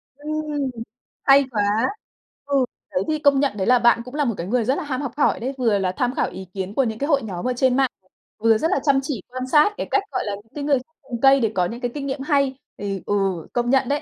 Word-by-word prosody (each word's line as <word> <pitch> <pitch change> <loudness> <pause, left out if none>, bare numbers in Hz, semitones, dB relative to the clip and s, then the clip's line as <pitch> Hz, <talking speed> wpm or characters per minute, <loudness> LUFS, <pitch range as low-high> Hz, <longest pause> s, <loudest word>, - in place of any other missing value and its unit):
Ừm, 300 -1 -3 0.5
hay 275 0 +6
quá! 210 -3 +1 0.8
Ừ, 275 -2 +2 0.3
đấy, 185 - 0
thì 310 -1 0
công 285 -2 +4
nhận 270 -7 0
đấy 190 - -1
là 250 0 +5
bạn 235 0 +4
cũng 250 - -9
là 295 -1 +1
một 235 - 0
cái 170 - -4
người 235 +1 +1
rất 260 +4 +2
là - - -3
ham 275 -2 -3
học 275 -5 -3
hỏi 295 - +2
đấy. 260 +4 -3
Vừa 225 -5 +2
là 185 -1 0
tham 250 +1 0
khảo - - 0
ý 190 0 -8
kiến 195 0 -4
của 270 - +2
những 220 -2 -3
cái 285 - -1
hội 275 -5 +3
nhóm 185 -1 -5
ở 255 - +1
trên 255 0 +2
mạng, 270 -1 +3 0.5
vừa 225 0 +4
rất 320 - 0
là - - +2
chăm 275 -2 +4
chỉ 265 -8 -3
quan 255 +1 -5
sát 305 +7 +5
cái - - -3
cách, 400 - +2
gọi - - -1
là, 205 -2 -2
những 210 +2 -16
cái 290 - -4
người 285 -1 +3 0.4
cây 275 0 +6
để 225 -4 +1
có 180 - +2
những 235 +7 -6
cái 245 - -2
kinh 280 -1 -5
nghiệm 270 0 -3
hay 275 -2 +1 0.2
thì, 195 -2 -4
ừ, - - -1 0.4
công 240 0 0
nhận 265 -1 +3
đấy. 285 +1 0
260 Hz, 270 wpm, -22 LUFS, 225-280 Hz, 0.8 s, hay